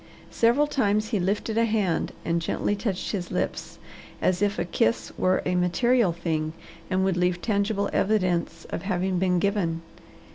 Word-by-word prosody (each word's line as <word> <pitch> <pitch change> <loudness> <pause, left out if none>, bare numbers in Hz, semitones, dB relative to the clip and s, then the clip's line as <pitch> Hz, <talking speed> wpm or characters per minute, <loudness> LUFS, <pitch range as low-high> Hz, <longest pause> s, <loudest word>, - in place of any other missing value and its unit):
Several 240 +6 +3
times 215 -7 +1
he 215 -4 0
lifted 205 +4 0
a 230 - +4
hand 210 -6 0
and 170 0 +1
gently 205 +4 -1
touched 200 -3 -2
his 185 -4 -3
lips, - - -3 0.4
as 185 0 +1
if 205 0 +1
a 175 - -1
kiss 110 -9 0
were 185 0 +1
a 180 - 0
material 190 +5 +3
thing 160 -2 -2 0.4
and 190 0 +1
would 190 -2 +1
leave 180 0 +1
tangible 200 0 0
evidence 180 -5 0
of - - -3
having 185 -1 -1
been 180 -1 +2
given. 175 -4 0
190 Hz, 160 wpm, -26 LUFS, 175-210 Hz, 0.4 s, a